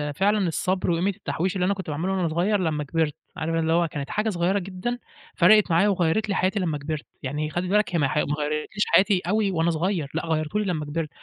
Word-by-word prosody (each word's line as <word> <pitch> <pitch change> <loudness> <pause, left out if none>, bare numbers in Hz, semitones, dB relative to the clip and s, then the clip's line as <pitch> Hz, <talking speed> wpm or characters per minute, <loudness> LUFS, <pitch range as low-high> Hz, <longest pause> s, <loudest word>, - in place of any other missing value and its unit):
فعلًا 200 +1 +2
الصبر 185 +2 0
وقيمة 175 +4 +1
التحويش، 190 -2 -2
اللي 180 -1 +1
أنا 200 - +2
كنت 190 -5 -7
باعمله 165 +6 -2
وأنا 180 -3 0
صغير 185 +6 +1
لما 155 -4 -1
كبِرت 155 0 -1 0.2
عارف 165 +1 -2
اللي 165 0 +1
هو 170 0 +3
كانت 145 -2 -6
حاجة 215 +1 0
صغيرة 185 +2 +1
جدًا 195 +7 -4 0.4
فرقت 200 +1 +5
معايا 185 +5 +4
وغيّرِت 190 +3 +1
لي 200 - 0
حياتي 190 +3 +1
لما 160 -5 -1
كبرت، 150 +1 -5 0.2
يعني 150 +3 -2
خلِّ 175 +3 -2
بالك 210 -3 +2
هي - - +2
ما 140 - +3
ح 150 - -2
ما - - +3 0.2
غيرتليش 150 +7 -1
حياتي 195 -2 +4
أوي 205 0 +1
وأنا 165 -1 +1
صغير 165 -2 -1
لأ 165 - -2
غيرتهُ 160 +5 -1
لي 210 - -1
لما 160 -5 -2
كبرت 155 +1 -3
175 Hz, 230 wpm, -25 LUFS, 160-195 Hz, 0.4 s, فرقت